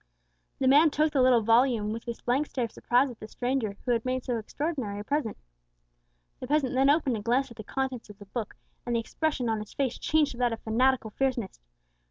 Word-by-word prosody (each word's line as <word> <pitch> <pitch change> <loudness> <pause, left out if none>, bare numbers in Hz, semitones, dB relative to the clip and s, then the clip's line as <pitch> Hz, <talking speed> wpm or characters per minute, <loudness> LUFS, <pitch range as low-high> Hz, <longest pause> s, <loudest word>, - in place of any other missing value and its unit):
The 265 - +1
man 295 +4 +6
took 305 +1 +1
the 275 - +3
little 250 -3 +5
volume 230 -1 +3
with 230 +2 -7
a 235 - -3
blank 265 +5 +1
stare 250 -3 -2
of 225 - -9
surprise 250 +2 +1
at 235 - -13
the 215 - -8
stranger 245 -3 -2
who 250 - +1
had 230 -1 +1
made 255 0 -2
so 245 -3 -1
extraordinary 260 -3 -3
a - - -5
present. 285 -2 -2 1.0
The 255 - -6
peasant 285 -2 +1
then 265 +2 +4
opened 285 -5 +2
and 205 - -7
glanced 250 +3 +1
at 235 - -13
the 215 - -7
contents 260 0 -3
of 205 - -12
the 205 - -12
book, 215 +1 -5 0.3
and 240 - -2
the - - +2
expression 280 +2 -2
on 220 -1 0
his 210 - -9
face 265 -3 -1
changed 310 -2 +2
to 240 - -10
that 245 -2 +2
of 225 - -5
fanatical 235 0 +1
fierceness. 255 -5 -2
250 Hz, 230 wpm, -28 LUFS, 225-270 Hz, 1.0 s, man